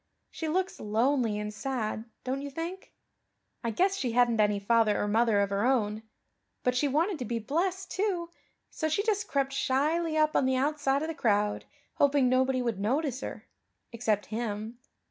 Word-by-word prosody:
She 320 - -4
looks 370 +4 -1
lonely 225 +1 +1
and 210 0 -4
sad, 220 -2 -3 0.2
don't 265 +2 -2
you 285 - -5
think? 335 +6 -6 0.7
I 235 - 0
guess 375 - +2
she 250 -11 -2
hadn't 240 -2 +4
any 210 -1 +3
father 215 0 +3
or 205 - 0
mother 220 -1 +3
of 200 0 0
her 200 +1 0
own. 220 -4 +1 0.6
But 250 0 +1
she 285 +4 +2
wanted 320 +5 +1
to 250 - -3
be 235 +1 -2
blessed, 360 - -2
too, 370 -4 -1 0.4
so 315 - -2
she 330 +6 +1
just 425 -2 0
crept 275 -1 0
shyly 310 +5 +1
up 310 0 +3
on - - +3
the 260 - +2
outside 280 +1 +1
of - - -2
the 325 - -3
crowd, 210 -6 +1 0.3
hoping 280 -2 +4
nobody 255 0 +2
would 230 -5 -2
notice 265 +5 0
her - - -6 0.5
except 220 -3 0
Him. 220 0 -4
260 Hz, 180 wpm, -29 LUFS, 220-310 Hz, 0.7 s, hadn't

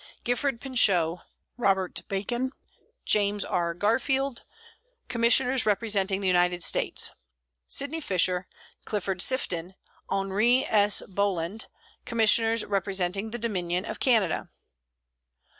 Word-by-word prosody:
GIFFORD 245 0 -1
PINCHOT, 185 -10 +3 0.4
ROBERT 195 -5 0
BACON, 240 +7 -2 0.5
JAMES 205 -1 +1
R. 170 -1 -1
GARFIELD, 260 +6 0 0.6
Commissioners 245 +1 +2
representing 200 -2 +1
the 195 - -1
United 180 -1 +2
States. - - +1 0.6
SYDNEY 290 +4 0
FISHER, 185 - +1 0.4
CLIFFORD 195 -3 -3
SIFTON, 185 -8 -1 0.3
HENRI 200 +6 +2
S. 205 -1 +3
BOLAND, 195 0 -2 0.4
Commissioners 225 0 +3
representing 195 0 -1
the 235 - -5
Dominion 185 -5 -2
of - - -6
Canada. 220 -10 +1
205 Hz, 95 wpm, -27 LUFS, 185-235 Hz, 0.6 s, PINCHOT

